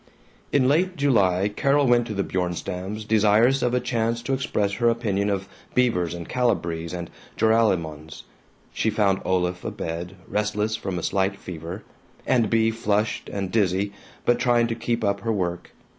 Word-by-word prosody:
In 130 -3 +3
late 180 +6 +2
July 100 -9 +3
Carol 140 +7 +2
went 120 -1 +3
to 105 - -4
the 100 - 0
Bjornstams' 90 +3 -3
desirous 110 +5 +4
of 125 0 +1
a - - +3
chance 115 -1 -1
to 135 - -1
express 105 -6 0
her 120 +2 +2
opinion 105 -4 0
of 95 -1 -2 0.3
Beavers 90 -10 +2
and 85 -1 -7
Calibrees 85 -10 -1
and 85 -1 -5 0.3
Joralemons. 85 -9 +1 0.5
She 110 - 0
found 100 -3 +1
Olaf 90 -1 0
abed, 85 +3 -5
restless 105 +1 -1
from 95 -2 -4
a 85 - -4
slight 95 0 0
fever, 85 +3 -7 0.4
and 115 -5 +2
Bea 115 0 +3
flushed 105 -1 -1
and 95 -2 -3
dizzy 100 -1 +1 0.3
but 120 - +3
trying 120 -1 +3
to - - 0
keep 115 0 -2
up 100 -1 +1
her 115 +3 -2
work. 90 -4 -2
105 Hz, 160 wpm, -24 LUFS, 90-115 Hz, 0.5 s, desirous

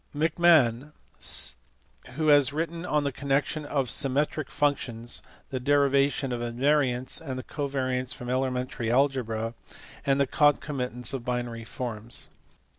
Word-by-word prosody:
462), 150 - +2 0.6
who 155 +3 +1
has 145 -2 +6
written 165 +3 -3
on 150 -1 +1
the 140 - 0
connection 140 +3 -1
of 140 -3 0
symmetric 140 +4 0
functions, 120 -5 -1 0.3
the 130 - -2
derivation 140 0 +2
of 120 -1 -2
invariants 130 +2 +1
and 130 -5 -5
covariants 130 -3 -2
from 125 -1 -7
elementary 125 -2 -1
algebra, 120 -4 +1 0.5
and 135 0 +2
the 140 - +4
concomitants 135 -4 +1
of 130 -3 -3
binary 120 -2 -3
forms. 115 -1 -4
135 Hz, 115 wpm, -27 LUFS, 125-145 Hz, 0.6 s, has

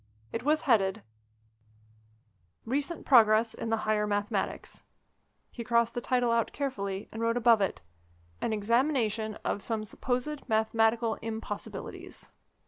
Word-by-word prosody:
It - - -2
was 310 +3 +1
headed: 210 -6 +2 1.6
"RECENT 285 +7 -2
PROGRESS 225 -3 +5
IN 230 - -5
THE 225 -1 -1
HIGHER 210 -1 +1
MATHEMATICS." 205 0 -2 0.7
He 235 - -6
crossed 235 0 +2
the 240 - -3
title 245 -1 +1
out 230 -1 +1
carefully, 200 -8 -3
and 225 - -6
wrote 230 +1 +1
above 235 -3 +5
it: 195 - -1 0.6
"AN - - -1
EXAMINATION 220 -1 +1
OF 200 - -1
SOME 220 0 -2
SUPPOSED 255 +6 -3
MATHEMATICAL 225 +1 +2
IMPOSSIBILITIES." 225 0 -7
225 Hz, 125 wpm, -29 LUFS, 215-245 Hz, 1.6 s, PROGRESS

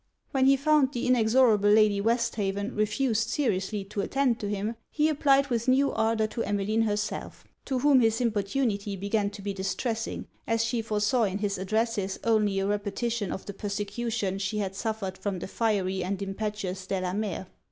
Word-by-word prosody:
When 265 -2 +3
he 275 0 +6
found 290 -1 +3
the 240 - -2
inexorable 225 -3 +4
Lady 210 -1 +5
Westhaven 210 -2 0
refused 225 +1 0
seriously 210 -6 -1
to 200 +1 -4
attend 260 0 +1
to 205 - -3
him, 210 +3 -2
he 305 0 +2
applied 280 -2 +3
with 235 +1 0
new 270 +2 +4
ardour 220 0 +1
to 230 - -4
Emmeline 205 +2 0
herself; 210 0 -3 0.2
to 265 - -1
whom 275 +1 +5
his 225 -2 +2
importunity 210 -2 0
began 200 +2 0
to 200 -1 -10
be 200 0 -2
distressing, 220 +4 -3 0.2
as 230 0 +1
she 230 0 -1
foresaw 215 +2 +1
in 195 -1 -2
his 200 -2 -2
addresses 205 0 -1
only 215 -4 +2
a 195 - +1
repetition 205 +1 -2
of 190 - -5
the 200 - -6
persecution 205 0 -3
she 200 +2 -2
had 195 -2 -2
suffered 200 -3 -3
from 200 -2 -2
the 175 - -6
fiery 190 -4 0
and 190 +1 -2
impetuous 195 -2 -4
Delamere. 190 +1 -2
215 Hz, 170 wpm, -27 LUFS, 200-235 Hz, 0.2 s, he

